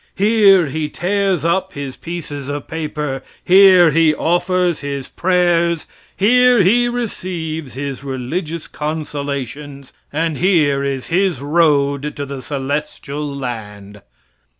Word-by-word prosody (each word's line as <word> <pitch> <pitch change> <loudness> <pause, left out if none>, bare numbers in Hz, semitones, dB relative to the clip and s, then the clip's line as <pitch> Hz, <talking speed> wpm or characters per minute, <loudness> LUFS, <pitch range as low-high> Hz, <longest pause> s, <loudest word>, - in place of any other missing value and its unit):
Here 200 -3 +5
he 150 +2 -3
tears 190 -2 0
up 190 +3 0
his 140 -2 -6
pieces 145 -5 -6
of 145 -1 -5
paper; 150 -4 -4 0.2
here 185 -3 +7
he 155 0 +3
offers 175 +1 +1
up - - -13
his 140 -2 -4
prayers; 175 -2 +1 0.3
here 250 +1 +5
he 240 +6 +3
receives 170 - -4
his 140 0 -5
religious 150 +5 -4
consolations, 145 -2 -5 0.2
and 160 -1 -1
here 155 -7 +2
is 135 -2 -3
his 180 -4 +1
road 145 -1 +1
to 145 - -4
the 140 -1 -7
celestial 145 +1 -4
land." 105 -6 -7
155 Hz, 120 wpm, -18 LUFS, 140-180 Hz, 0.3 s, here